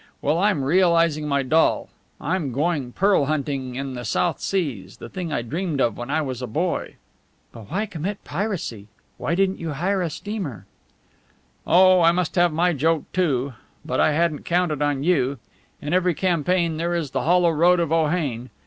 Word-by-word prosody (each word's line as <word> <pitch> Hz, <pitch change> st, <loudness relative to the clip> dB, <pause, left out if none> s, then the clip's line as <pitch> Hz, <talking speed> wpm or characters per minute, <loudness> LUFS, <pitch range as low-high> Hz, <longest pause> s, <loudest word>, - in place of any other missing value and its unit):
Well, 150 Hz, +4 st, +1 dB
I'm 195 Hz, -7 st, +2 dB
realizing 165 Hz, -1 st, +3 dB
my 140 Hz, -1 st, +1 dB
doll. 160 Hz, +5 st, +2 dB, 0.3 s
I 165 Hz, +5 st, -1 dB
am 155 Hz, -8 st, -2 dB
going 145 Hz, -1 st, -1 dB
pearl 195 Hz, -1 st, +2 dB
hunting 135 Hz, -3 st, -2 dB
in 135 Hz, 0 st, -4 dB
the 125 Hz, -1 st, -6 dB
South 165 Hz, +9 st, 0 dB
Seas 130 Hz, -, -3 dB
the -, -, -9 dB
thing 180 Hz, -4 st, -5 dB
I 120 Hz, -, -1 dB
dreamed 155 Hz, +4 st, -3 dB
of 120 Hz, -4 st, +2 dB
when 120 Hz, +2 st, -7 dB
I 155 Hz, +2 st, +1 dB
was 130 Hz, -3 st, -5 dB
a 125 Hz, -, -4 dB
boy." 165 Hz, +10 st, -2 dB, 0.6 s
"But 110 Hz, -3 st, -12 dB
why 195 Hz, +6 st, -1 dB
commit 195 Hz, +1 st, -5 dB
piracy? 150 Hz, -, -4 dB, 0.3 s
Why 165 Hz, -, -1 dB
didn't 195 Hz, +1 st, +1 dB
you 165 Hz, -3 st, -4 dB
hire 185 Hz, +6 st, 0 dB
a 175 Hz, -, -1 dB
steamer?" 180 Hz, -, -6 dB, 1.0 s
"Oh, 185 Hz, +1 st, +6 dB
I 165 Hz, 0 st, +6 dB
must 180 Hz, -2 st, -1 dB
have 175 Hz, -1 st, +3 dB
my 175 Hz, +3 st, +2 dB
joke, 160 Hz, +2 st, 0 dB
too. 140 Hz, -7 st, 0 dB, 0.3 s
But 155 Hz, -, -2 dB
I 155 Hz, -, +4 dB
hadn't 160 Hz, -1 st, 0 dB
counted 170 Hz, -4 st, 0 dB
on 145 Hz, -2 st, 0 dB
you. 140 Hz, -5 st, +1 dB, 0.5 s
In 150 Hz, +3 st, -2 dB
every 180 Hz, -2 st, +2 dB
campaign 170 Hz, -1 st, +1 dB
there 170 Hz, +2 st, -1 dB
is 160 Hz, -5 st, -2 dB
the -, -, -1 dB
hollow 175 Hz, 0 st, +3 dB
road 175 Hz, +3 st, +4 dB
of 165 Hz, -2 st, -1 dB
Ohain. 150 Hz, -7 st, 0 dB
160 Hz, 185 wpm, -23 LUFS, 140-180 Hz, 1.0 s, Oh